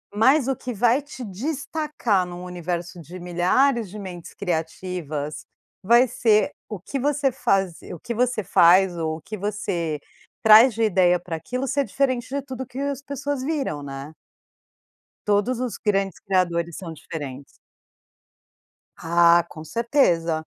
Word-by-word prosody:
Mas 260 +5 +4
o 270 - +1
que 250 -1 -6
vai 240 +5 +3
te 275 -3 -9
destacar 265 - -1
num 180 0 -8
universo 175 -1 -5
de 175 +4 -10
milhares 185 +7 +1
de 210 - -9
mentes 180 -4 -8
criativas, 160 -4 -4 0.4
vai 235 +6 +5
ser 225 -3 +2 0.2
o 210 - -5
que 235 +10 -5
você 290 +1 +1
fazi 190 -8 -1
o 175 - -8
que 235 - -5
você 245 -1 +1
faz, 180 0 +5
ou 160 -1 -2
o - - -14
que 215 - -7
você 185 -6 -2 0.4
traz 220 +3 +8
de 225 +2 -1
ideia 180 -4 +3
pra 170 -1 -5
aquilo 250 +12 -4
ser 280 +2 +1
diferente 255 -3 -1
de 280 +2 -2
tudo 260 -1 -6
que 255 +1 -9
as 280 -1 -2
pessoas 280 -1 -4
viram, 270 - -2
né. 140 +2 -7 1.2
Todos 210 +4 +1
os 250 -3 -3
grandes 195 -3 0
criadores 175 -4 0
são 180 -4 -7
diferentes. 145 -3 -7 1.6
Ah, 170 +1 +5
com 155 - -10
certeza. 170 - +1
200 Hz, 145 wpm, -23 LUFS, 170-255 Hz, 1.6 s, traz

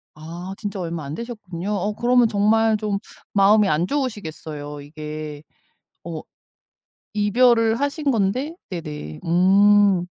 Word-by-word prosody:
아 170 +5 -7
진짜 205 -2 -5
얼마 170 -3 -4
안 140 - -6
되셨군요. 205 -5 -6
어 205 +1 -1
그러면 240 +2 +3
정말 220 +1 +3
좀 210 -2 -1 0.4
마음이 205 +1 +5
안 155 +4 +1
좋으시겠어요. 160 - -4
이게 150 0 -7 0.6
어 165 -2 -6 0.9
이별을 230 +2 +3
하신 285 0 0
건데 250 +8 0
네네. 150 - -6
음. 195 +2 +4
200 Hz, 235 characters per minute, -22 LUFS, 165-220 Hz, 0.9 s, 마음이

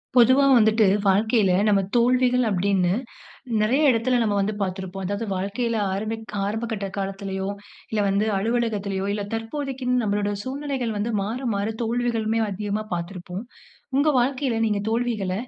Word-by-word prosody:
பொதுவா 260 +3 +6
வந்துட்டு, 220 -1 +4 0.2
வாழ்க்கையில 205 0 +3 0.2
நம்ம 205 -2 +4 0.2
தோல்விகள் 250 +1 +3
அப்டின்னு, 190 -2 +1 0.7
நெறைய 250 +8 +2
எடத்தில 245 +2 +2
நம்ம 210 -2 +1
வந்து 205 +2 0
பார்த்திருப்போம். 190 0 -4
அதாவது 205 +4 -3
வாழ்க்கையில 210 +5 -2 0.2
ஆரம்ப 200 +3 -2 0.4
ஆரம்பகட்ட 220 -1 -3
காலத்திலயோ, 195 0 -3 0.4
இல்ல 220 - 0
வந்து 200 +2 +1
அலுவலகத்திலயோ, 205 -3 -1
இல்ல 205 0 -2
தற்போதைக்கு 260 +3 -4 0.2
நம்மளோட 205 -1 0
சூழ்நிலைகள் 260 -3 -3
வந்து 215 +3 -1
மாற, 220 +5 -3 0.2
மாற 200 +1 -1 0.2
தோல்விகளுமே, 225 -1 0
அதிகமா 205 +2 -3
பார்த்திருப்போம். 180 +3 -6 0.5
உங்க 285 +3 +3
வாழ்க்கையில 255 -1 0
நீங்க 210 -2 0
தோல்விகளை 225 -5 -1
215 Hz, 130 wpm, -24 LUFS, 195-240 Hz, 0.7 s, பொதுவா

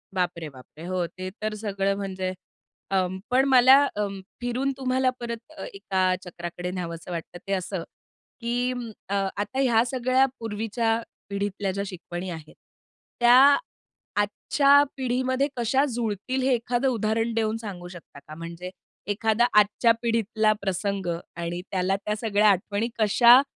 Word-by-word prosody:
बापरे, 170 -3 -1
बापरे! 135 +4 -13
हो 185 -1 -1
ते 185 +2 -7
तर 215 0 -1
सगळं 200 -2 -1
म्हणजे 190 -2 -3 0.6
अं, 190 -1 +1
पण 255 +2 +4
मला 260 0 +8 0.2
अं, 200 -2 -2 0.2
फिरून 250 +3 -1
तुम्हाला 260 0 +1
परत 235 -1 -4 0.2
अ, - - -6
एका 190 -2 +1
चक्राकडे 175 0 -6
न्यावंसं 170 -1 -5
वाटतं 170 +1 -6
ते 195 - 0
असं, 185 -1 -2 0.6
की 245 +2 0 0.4
अ, 200 - 0 0.2
आता 210 +6 -2
ह्या 235 -4 +4
सगळ्या 255 +1 +2
पूर्वीच्या 225 +1 -1 0.3
पिढीतल्या 200 0 -2
ज्या 200 +1 -3
शिकवणी 180 0 -6
आहेत. 160 -3 -8 0.6
त्या 240 +1 +7 0.9
आजच्या 280 +7 +4
पिढीमध्ये 260 +1 0
कशा 255 +4 +2
जुळतील 235 +3 -2
हे 265 0 +3
एखादं 245 +2 0
उदाहरण 225 0 0
देऊन 220 -1 0
सांगू 195 -6 -7
शकता 175 -5 -12
का? 155 +2 -12
म्हणजे 170 +2 -7 0.4
एखादा 220 +3 +2
आजच्या 210 +3 +4
पिढीतला 225 -2 +1
प्रसंग 195 0 -2 0.3
आणि 170 +1 -4
त्याला 190 0 +1
त्या 210 - 0
सगळ्या 210 -2 +3
आठवणी 205 +4 0
कशा 235 +4 +7
210 Hz, 140 wpm, -25 LUFS, 185-240 Hz, 0.9 s, मला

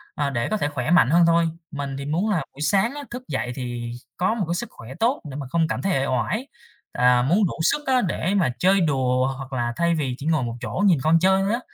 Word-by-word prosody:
ờ, 145 -1 0
để 120 -3 -1
có 215 - 0
thể 145 - -1
khỏe 140 +2 -3
mạnh 175 -8 +5
hơn 170 +2 +5
thôi. 165 0 +3 0.2
Mình 140 -2 -4
thì 140 - -5
muốn 175 +9 0
là 195 - +2 0.2
buổi 145 - -11
sáng 200 - +2
á 290 - -6
thức 250 +1 -6
dậy 125 - -2
thì 120 -2 -5 0.3
có 185 +5 +1
một 210 -6 -2
cái 170 - -1
sức 235 - -4
khỏe 115 +3 -11
tốt 245 +5 +1
để 135 - -8
mà 140 -3 -5
không 165 0 +1
cảm - - -3
thấy 195 -1 0
uể 135 - 0
oải, 130 - -1 0.4
à, 125 0 +3
muốn 180 - +3
đủ - - -2
sức 295 - +1
á 255 -1 +3
để 185 0 -1
mà 170 -9 +2
chơi 190 +1 +4
đùa 130 -4 +1
hoặc 135 -1 -8
là 120 -1 -1
thay 170 0 +1
vì 135 -5 -2
chỉ 140 - -8
ngồi 160 -5 +1
một 120 0 -4
chỗ 195 - -2
nhìn 170 -8 +4
con 165 +1 +4
chơi 190 +2 +3
thôi 200 +3 0
á. 240 - 0
160 Hz, 270 wpm, -23 LUFS, 130-195 Hz, 0.4 s, mạnh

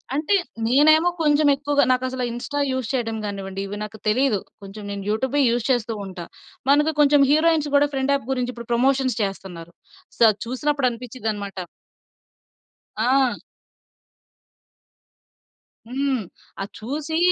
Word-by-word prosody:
అంటే 310 +7 +1 0.3
నేనేమో 310 +6 +5
కొంచెం 300 -1 +3
ఎక్కువగా 285 +1 +1
నాకసలు 255 0 -1
ఇన్స్‌స్టా 265 +5 -4
యూజ్ 260 -3 -2
చేయడం 225 -3 -1
గానివ్వండి 195 -1 -5
ఇవి 205 +1 -6
నాకు 215 +1 -8
తెలియదు. 230 -2 +2 0.2
కొంచెం 195 +2 -9
నేను 200 -1 -5
యూట్యూబే 265 +6 0
యూజ్ 235 -1 0
చేస్తూ 230 -2 0
ఉంటా. 180 -3 -7 0.4
మనకు 295 +2 +4
కొంచెం 290 -1 +5
హీరోయిన్స్ 310 -1 +3
గూడా 290 +1 +5
ఫ్రెండ్ 270 +1 +1
యాప్ 265 -3 -5
గురించి 250 -1 -1
ఇప్పుడు 235 0 -10
ప్రమోషన్స్ 260 0 +2
చేస్తున్నారు. 180 -4 -6 0.4
సో - - -12
అది 205 - -11
చూసినప్పుడు 275 +2 0
అనిపించిద్దన్నమాట. 220 -5 -5 1.4
ఆ! 255 +3 +2 2.5
హ్మ్. 265 -1 -1 0.4
అది 195 - -3
చూసి 295 +7 -3
255 Hz, 125 wpm, -23 LUFS, 220-285 Hz, 2.5 s, నేనేమో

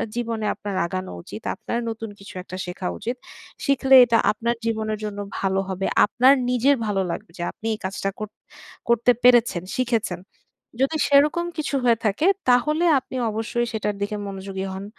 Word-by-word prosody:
জীবনে 230 -2 -2
আপনার 205 -2 -5
আগানো 185 +1 -4
উচিত, 105 - -9
আপনার 235 - -3
নতুন 225 0 -5
কিছু 195 +1 -11
একটা 185 0 -8
শেখা 180 +1 -5
উচিত। 240 +2 -3 0.5
শিখলে 270 -1 +4
এটা 230 -1 +3
আপনার 235 +2 -1
জীবনের 215 -1 -1
জন্য 205 -1 -5 0.2
ভালো 195 0 0
হবে। 190 0 -2 0.2
আপনার 255 +5 +5 0.2
নিজের 250 +3 +3
ভালো 200 -2 0
লাগবে 165 - -7
যে 175 - -4
আপনি - - -14
এই - - -14
কাজটা 195 +1 -2
কর 215 - -3 0.6
করতে 235 +1 +4
পেরেছেন, 240 -8 +5
শিখেছেন। 230 -8 -1 0.6
যদি 275 +4 +2
সেরকম 295 +4 +4
কিছু 295 -2 -2
হয়ে 235 -2 +4
থাকে, 210 +9 +1 0.2
তাহলে 300 +7 +3
আপনি 260 - -11 0.2
অবশ্যই 225 +2 -1
সেটার 210 -1 -2
দিকে 205 +1 -2
মনোযোগী 195 0 -5
হন। 190 +1 -6
225 Hz, 165 wpm, -23 LUFS, 195-250 Hz, 0.6 s, আপনার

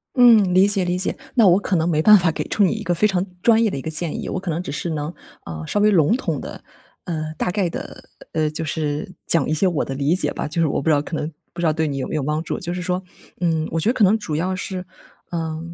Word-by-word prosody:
嗯， 225 -7 +6
理 190 +2 +6
解 200 -3 +2
理 175 0 0
解。 185 - +1 0.2
那 230 -5 +6
我 180 +1 +5
可 200 -2 -1
能 165 0 +1
没 155 -3 +1
办 210 +5 +8
法 175 -3 +2
给 - - -3
出 210 - +2
你 190 - +3
一 220 - -5
个 175 - 0
非 210 +5 +3
常 190 -2 0 0.2
专 230 +1 +4
业 220 - +1
的 - - -4
一 135 - -4
个 160 - -5
建 160 0 -2
议。 - - -5
我 - - -2
可 185 -2 -4
能 165 +3 -2
只 - - -6
是 165 +4 -3
能， 150 +1 -3 0.3
呃， 80 -1 -6
稍 205 - -1
微 210 - +5
笼 175 0 +4
统 265 - -2
地， - - -9 0.4
呃， 155 -3 -4
大 180 - -1
概 185 -1 0
地 - - -4 0.5
呃， 155 -1 +1
就 160 +1 -4
是 155 +3 -3
讲 165 - +1
一 - - +1
些 190 +5 +2
我 170 -5 0
的 135 - -5
理 140 +5 +1
解 185 - 0
吧， - - -4
就 160 +3 -2
是 160 - +3
我 - - -1
不 140 - -5
知 - - +5
道 145 - +2
可 160 - -6
能 155 +1 -3 0.2
不 - - -11
知 170 - 0
道 155 - +3
对 160 0 0
你 140 - -3
有 135 - -3
没 - - -4
有 155 - 0
帮 150 +3 -1
助。 - - -4
就 170 - -4
是 180 - -4
说， 180 +1 -1 0.4
嗯， 160 -2 +1
我 165 - 0
觉 210 - +1
得 245 - +3
可 220 - +2
能 200 +2 +5
主 170 -8 -4
要 185 +4 -1
是 185 -1 -5 0.5
呃， 160 -2 -3
170 Hz, 320 characters per minute, -21 LUFS, 155-190 Hz, 0.5 s, 办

